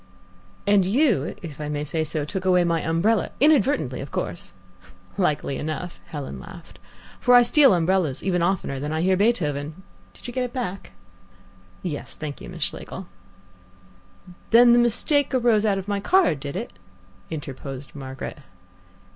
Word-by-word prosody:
"And 200 -1 +4
you, 200 - +1
if 155 -3 -8
I 150 - -4
may 145 0 -2
say 160 +2 -2
so, 155 -1 -1
took 185 +5 -4
away 180 -1 +4
my 170 -2 +1
umbrella, 185 +7 +1
inadvertently 280 - +3
of 135 - -7
course." 185 -2 -4 0.6
"Likely 150 -7 0
enough," 155 +3 -5
Helen 145 -5 -6
laughed, 175 -1 -12 0.4
"for 245 -1 +5
I 245 - +8
steal 275 +2 +6
umbrellas 170 -4 +1
even 180 -2 +1
oftener 170 -6 -1
than 145 +2 -4
I 160 +1 -1
hear 190 +1 +3
Beethoven. 165 -6 0 0.3
Did - - -16
you 245 - -6
get 255 0 0
it 245 - -5
back?" 195 - -5 0.9
"Yes, 155 -5 -5
thank 150 -2 -7
you, - - -9
Miss 175 -4 -5
Schlegel." 190 - -4 1.4
"The 235 +2 +7
mistake 240 +4 +3
arose 230 -4 +3
out 200 -2 +2
of 195 0 -5
my 200 -1 -1
card, 345 - +3
did 140 +2 -6
it?" 225 +6 -5 0.6
interposed 135 -3 -7
Margaret. 135 -2 -7
180 Hz, 155 wpm, -24 LUFS, 150-230 Hz, 1.4 s, I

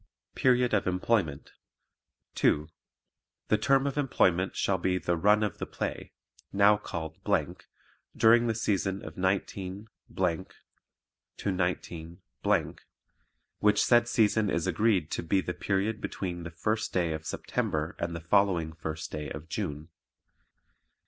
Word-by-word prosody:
Period 125 -2 +3
of 100 - +2
Employment 90 -5 0 0.8
2. 75 +1 +2 0.8
The 110 - +4
term 135 +4 +3
of 140 +1 -1
employment 95 -9 +2
shall 95 -2 +1
be 90 +1 +1
the 85 0 0
Run 105 +5 +4
of 105 -4 -2
the - - -4
Play - - -5 0.4
now 100 +1 +5
called 80 -6 -6 1.0
during 115 +1 +5
the 115 - 0
season 95 -3 -1
of 80 - -8
19 95 +2 -2 1.5
19 90 -3 -2 1.4
which 105 0 +4
said 120 -1 +4
season 110 -3 +2
is 85 -2 0
agreed 95 -2 +1
to - - -1
BE 90 +4 +1
THE 90 -1 -3
PERIOD 100 +4 -1
BETWEEN 90 -2 -4
THE - - -4
FIRST 105 +7 -2
DAY 85 -3 0
OF 80 0 -5
SEPTEMBER 75 +2 -2
AND 85 0 -2
THE 85 - -5
FOLLOWING 85 -3 +2
FIRST 80 0 -6
DAY 75 -1 -4
OF 75 - -8
JUNE. 75 +1 -4
95 Hz, 130 wpm, -29 LUFS, 85-105 Hz, 1.5 s, now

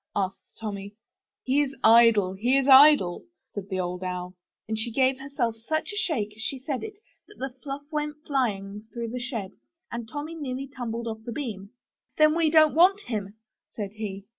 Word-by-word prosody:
asked 190 -2 -3
Tommy. 200 -2 -6 0.5
*'He 270 +3 +2
is 280 -1 -2
idle, 220 -4 +6
he 240 +8 +2
is 270 0 +1
idle,'' 270 -10 +7 0.3
said 200 -1 -6
the 190 -2 -2
Old 180 0 -3
Owl, 180 0 -4 0.3
and 220 - -1
she 220 +2 -3
gave 260 +2 +2
herself 270 -4 -2
such 315 - -3
a - - -6
shake 245 - -1
as 220 - -11
she 270 - -2
said 260 0 -4
it 420 -2 -7 0.3
that 420 - -17
the 265 -1 -5
fluff 280 0 -5
went 300 -1 -2
flying 210 -6 -2
through 235 -2 -4
the 250 +2 -4
shed, 235 -6 -4 0.4
and 235 -1 -5
Tommy 295 +5 -5
nearly 275 -4 -4
tumbled 235 -4 -5
off 220 -1 -5
the 235 - -6
beam. 220 -7 -5 0.5
'Then 305 0 +6
we 330 -2 +3
don't 310 -1 +6
want 370 +5 +5
him," 210 - -4 0.4
said 205 -3 -4
he. 200 -2 -6
235 Hz, 190 wpm, -26 LUFS, 205-285 Hz, 0.5 s, idle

